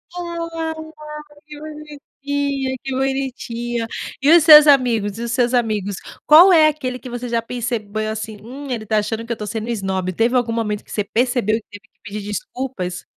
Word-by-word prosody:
Ai, 335 -2 -4 0.7
que 300 -1 -11
bonitinha, 285 -3 -4
que 270 - -5
bonitinha! 245 -3 -2 0.4
E 285 - +4
os 330 - +4
seus 305 -2 +10
amigos? 235 -7 +3
E - - -5
os 235 -1 -3
seus 245 +1 +1
amigos? 210 -5 0 0.3
Qual 340 +5 +8
é 315 -3 +6
aquele 255 -4 -3
que 255 - -10
você 245 0 -5
já 235 -1 0
percebeu, 220 -3 -3
assim, 220 0 -5
hum, 270 +5 -9
"Ele 230 -3 -3
tá 215 0 +1
achando 225 +2 -2
que 235 - -4
eu 235 - -3
tô 210 - -6
sendo 220 +1 -4
esnobe". 190 -5 -2
Teve 230 +6 +1
algum 240 -2 +1
momento 210 -2 -2
que - - -14
você 210 - -1
percebeu 235 0 0
e 225 - -4
que - - -72
teve 220 - -30
que - - -46
pedir 210 -1 -6
desculpas? 205 -4 -5
240 Hz, 190 wpm, -20 LUFS, 220-280 Hz, 0.7 s, seus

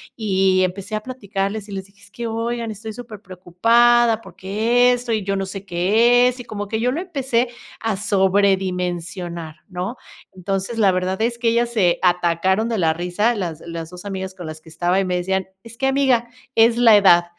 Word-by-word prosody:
y 190 -3 +2
empecé 195 +3 -3
a 215 - -2
platicarles 210 -4 -4
y - - -9
les 190 -1 -5
dije: 195 0 -24
"Es 205 -1 -18
que 235 -1 -5
oigan, 230 0 -3
estoy 215 +1 -7
superpreocupada 230 +2 +2
porque 230 +7 +1
esto 245 -1 -3
y 215 -3 0
yo 195 0 -1
no 195 - -2
sé 195 +1 -8
qué 225 +8 +3
es", 250 0 -7
y - - -6
como 205 -3 -5
que 220 +1 -2
yo 250 +2 +1
lo 310 - -2
empecé 265 -9 -1 0.3
a 225 -4 -1
sobredimensionar, 180 -4 0
¿no? 185 +6 -5 0.4
Entonces, 195 +4 -3
la 200 -4 +4
verdad 185 +2 -2
es 235 +1 0
que 235 -1 +1
ellas 235 +1 +1
se 185 -7 +2
atacaron 180 +4 +1
de 225 - -1
la 160 -3 +2
risa 180 +8 0
las 170 -6 -4
las 165 -1 -7
2 180 +2 -11
amigas 190 -1 -5
con 175 -3 -8
las 155 0 -8
que 160 - -16
estaba 175 +3 0
y 195 - 0
me 180 -1 -1
decían, 190 +1 -1 0.2
es 230 0 -13
que 270 - 0
amiga, 265 -3 +2 0.3
es 230 +1 +5
la 230 -3 +7
edad, 175 -3 +5
200 Hz, 195 wpm, -21 LUFS, 185-230 Hz, 0.4 s, la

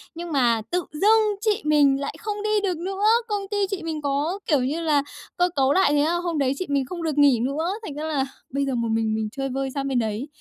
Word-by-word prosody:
Nhưng 340 0 -6
mà 240 -5 +2
tự 360 -1 0
dưng 425 +5 +3
chị 430 -1 +1
mình 285 -3 +4
lại 280 - -4
không 420 -1 -4
đi 425 -1 +1
được 365 -4 0
nữa! 385 +4 -3 0.2
Công 415 -2 -1
ty 410 - -1
chị 375 -4 -3
mình 315 -2 -4
có, 290 +7 -1
kiểu 295 -4 +3
như 305 +6 -1
là, 295 -3 +2 0.3
cơ 355 0 +3
cấu 270 0 +3
lại 380 -6 +4
thế 290 0 +3
là 340 +2 +1
hôm 345 -2 -2
đấy 270 -1 +2
chị 370 - -2
mình 280 -2 +1
không 340 +4 -6
được 305 -3 -2
nghỉ 280 -5 +5
nữa, 280 +8 -1 0.2
thành 290 - -6
ra 300 - -5
là 290 -4 0 0.3
bây 280 0 0
giờ 270 - -1
một 235 -1 -1
mình 220 -1 0
mình 220 -1 -1
chơi 270 0 -3
vơi 270 +1 -2
sang 275 0 -3
bên 260 -3 +1
đấy. 220 +5 -2
295 Hz, 260 wpm, -24 LUFS, 270-360 Hz, 0.3 s, nghỉ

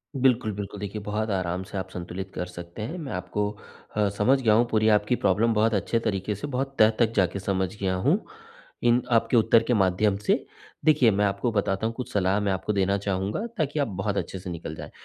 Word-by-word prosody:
बिल्कुल, 125 -4 +2
बिल्कुल 100 0 -6
देखिए, 105 +1 -5
बहुत 105 +2 -2
आराम 95 -2 -1
से 100 - -7
आप 95 - -4
संतुलित 90 +2 -6
कर 90 - -2
सकते 85 +2 -9
हैं, 120 +12 -4
मैं 150 -6 -6
आपको 90 +3 -2 0.5
अ, 105 -1 +2
समझ 130 +6 +4
गया 110 -4 +4
हूँ 115 +3 +4
पूरी 110 -1 +2
आपकी 105 +3 +3
प्रॉब्लम 110 +3 +2
बहुत 110 +1 +2
अच्छे 105 +3 +1
तरीके 105 -2 -2
से, 105 - -5
बहुत 135 0 -3
तह 110 - +7
तक 115 -2 +3
जाके 95 -1 +1
समझ 95 0 -1
गया 95 -2 0
हूँ, 140 - +2 0.6
इन 120 +1 +4
आपके 115 +1 +3
उत्तर 115 0 +5
के 120 - +1
माध्यम 100 0 +2
से। 105 - +1 0.4
देखिए, 145 -7 +5
मैं 105 +1 +2
आपको 100 +4 0
बताता 100 -1 0
हूँ, 115 - -1
कुछ 125 - -6
सलाह 95 0 +2
मैं 100 -1 0
आपको 95 +3 -1
देना 100 0 +2
चाहूँगा 100 - -2
ताकि 150 -2 -1
आप 140 - +1
बहुत 100 0 -2
अच्छे 95 - -3
से 90 0 -7
निकल 85 -2 -6
जाएँ, - - -9
105 Hz, 220 wpm, -26 LUFS, 95-115 Hz, 0.6 s, तह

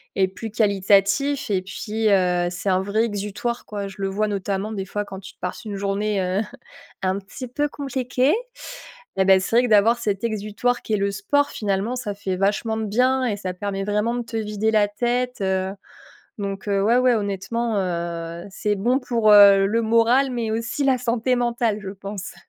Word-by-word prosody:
est 190 -1 +3
plus 195 +4 -7
qualitatif. 205 +5 +2
Et 190 -2 +1
puis, 215 +3 -2
heu, 180 -3 +2
c'est 180 +2 -3
un 185 0 +2
vrai 205 +3 0
exutoire, 210 +3 -3
quoi. 200 -1 -4
Je 195 - -11
le 195 - -1
vois 205 +3 0
notamment, 200 +1 -2
des 195 -3 -4
fois, 205 +2 -3
quand 190 -1 -8
tu 190 - -11
passes 180 - -5
une 210 -3 -5
journée, 200 +1 -1
heu, 185 +2 0 0.6
un 190 +1 0
petit 200 +6 -9
peu 290 +5 -1
compliquée 265 0 0 0.9
et 190 - +4
bah, 190 0 +6
c'est 185 +4 -2
vrai 245 - +5
que - - -2
d'avoir 220 +2 +5
cet 205 -3 -2
exutoire 220 +2 -1
qui 220 - -3
est - - +3
le 200 0 0
sport, 245 +9 +1
finalement, 205 +3 -2
ça 240 -5 -4
fait 195 -2 -3
vachement 210 +3 0
de 220 - -2
bien 255 +5 +2
et 220 -4 0
ça 185 -2 -4
permet 195 +1 -3
vraiment 210 +3 0
de 245 - -2
te 230 -1 -5
vider 215 0 -1
la 210 -2 +3
tête. 245 +2 -1 1.0
Donc, 195 -1 -4
heu, 200 -1 +1
ouais, 225 +4 +3
ouais, 255 -1 +4
honnêtement, 215 +2 -2
heu, 170 -2 -3
c'est 210 +2 -1
bon 240 +7 +2
pour, 230 -4 +2
heu, 200 -1 +8
le 225 +3 +1
moral 230 +4 +3
mais 235 -3 -2
aussi 230 +5 -2
la 265 -2 +3
santé 245 +1 0
mentale, 235 -3 0
je 195 -2 -6
pense. 200 -1 -7
210 Hz, 195 wpm, -23 LUFS, 195-235 Hz, 1.0 s, heu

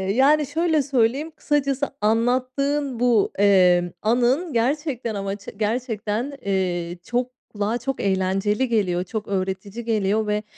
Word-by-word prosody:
yani 295 +4 +4
şöyle 320 +2 +1
söyleyeyim, 270 +3 0
kısacası 280 -1 0
anlattığın 255 +4 0
bu, 240 -4 +3
eee, 180 -3 +4
anın 250 +9 +1
gerçekten 250 -1 -1
ama 195 0 -3
ç 205 - -16
gerçekten, 225 +2 -2
eee, 180 -3 -1
çok 245 +4 -2 0.2
kulağa 210 +3 -1
çok 270 +3 -4
eğlenceli 195 +5 +1
geliyor, 185 -6 +1
çok 215 +3 -5
öğretici 195 +3 -3
geliyor 215 -1 +1
ve 210 0 0
225 Hz, 125 wpm, -23 LUFS, 200-265 Hz, 0.2 s, yani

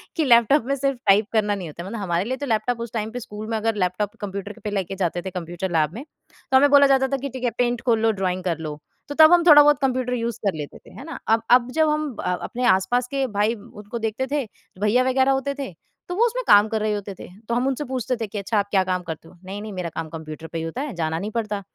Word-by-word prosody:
कि 320 - +1
लैपटॉप 235 +1 +5
में 275 +2 0
सिर्फ़ 275 -1 -1
टाइप 200 +2 +5
करना 210 -2 +2
नहीं 185 -4 -6
होता 170 +3 -8
है। - - -8
मतलब 230 +1 -5
हमारे 175 -1 0
लिए 260 +3 -2
तो 285 - -4
लैपटॉप 235 0 0
उस 235 -2 -5
टाइम 220 -1 -3
पे 245 - -5
स्कूल 215 -2 -8
में 225 - 0
अगर 225 0 0
लैपटॉप 205 +4 -3
कंप्यूटर 200 +1 -6
पे 210 - -2
लेके 195 -2 -2
जाते 175 0 -1
थे 190 - -5
कंप्यूटर 175 +1 -5
लैब 155 -1 +1
में, 235 +6 -7 0.5
तो 265 - +7
हमें 285 +2 +5
बोला 280 0 +7
जाता 265 -1 +3
था 275 +1 -1
कि 275 +1 -5
ठीक 260 0 -8
है, 245 - +2
पेंट 240 -1 0
खोल 230 -3 +3
लो, 225 0 +3
ड्रॉइंग 185 -3 -2
कर 170 -4 -1
लो, 150 -2 -6 0.3
तो 290 - -6
तब 315 +1 +8
हम 350 -1 +5
थोड़ा-बहुत 295 -2 +8
कंप्यूटर 255 -2 0
यूज़ 235 -1 -2
कर 200 - +2
लेते 145 -1 -7
थे, - - -18
है - - -10
ना? 330 - -7
अब 225 +1 +3
अब 245 0 +5
जब 315 +2 +2
हम 300 -4 -1
अ, 180 - -1
अपने 250 0 -4
आस-पास 190 +6 +2
के 275 +1 -1
भाई 210 +3 +2
उनको 210 +1 -9
देखते 225 +4 -2
थे, 290 -3 0 0.4
भैया 215 +5 +3
वगैरह 260 +1 +3
होते 270 +1 0
थे, 270 -8 -4 0.4
तो 355 - -3
वो 455 +5 +4
उसमें - - -1
काम 205 +1 +7
कर 220 0 -2
रहे 215 0 0
होते 205 -1 -4
थे, - - -9 0.2
तो 235 - +1
हम 250 +2 +1
उनसे 270 +2 -1
पूछते 255 -1 -1
थे 225 -2 -4
कि, 205 - -7
"अच्छा, 200 +2 -1
आप 200 - -1
क्या 190 -2 +3
काम 185 -1 -2
करते 165 -1 -7
हो? - - -17
नहीं-नहीं 205 +3 -7
मेरा 180 -2 -4
काम 160 -1 -4
कंप्यूटर 160 0 -8
पे 165 - -6
ही 160 - -3
होता 165 +11 -4
है, 290 -3 -4
जाना 160 -1 -1
नहीं 205 +4 -4
पड़ता।" 215 -3 -2
220 Hz, 280 wpm, -23 LUFS, 190-260 Hz, 0.5 s, तब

